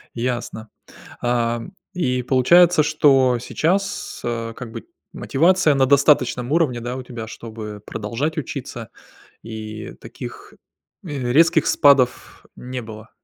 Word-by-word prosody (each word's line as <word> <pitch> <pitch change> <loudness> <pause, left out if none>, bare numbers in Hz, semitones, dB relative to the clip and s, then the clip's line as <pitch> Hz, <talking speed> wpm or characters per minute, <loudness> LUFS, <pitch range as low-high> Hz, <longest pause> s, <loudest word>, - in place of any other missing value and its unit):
Ясно. 120 -2 -4 0.5
А, 120 -1 0 0.3
и 125 -8 -1
получается, 160 +6 +5
что 135 -5 +3
сейчас, 185 +10 -2
а, 115 -1 -3
как 115 0 -9
бы - - -8 0.3
мотивация 165 +1 +2
на 135 -1 +3
достаточном 135 -2 +3
уровне, 150 -7 +1
да, 120 +2 -4
у 130 - -6
тебя, 120 -3 -8
чтобы 110 -2 -8
продолжать 120 +9 -3
учиться, 120 -5 -6 0.5
и 110 -1 -8
таких, - - -10 0.5
э, 135 -7 -3
резких 165 +2 +4
спадов 135 -4 +2
не 125 0 -6
было? 110 -1 -11
125 Hz, 120 wpm, -21 LUFS, 115-150 Hz, 0.5 s, получается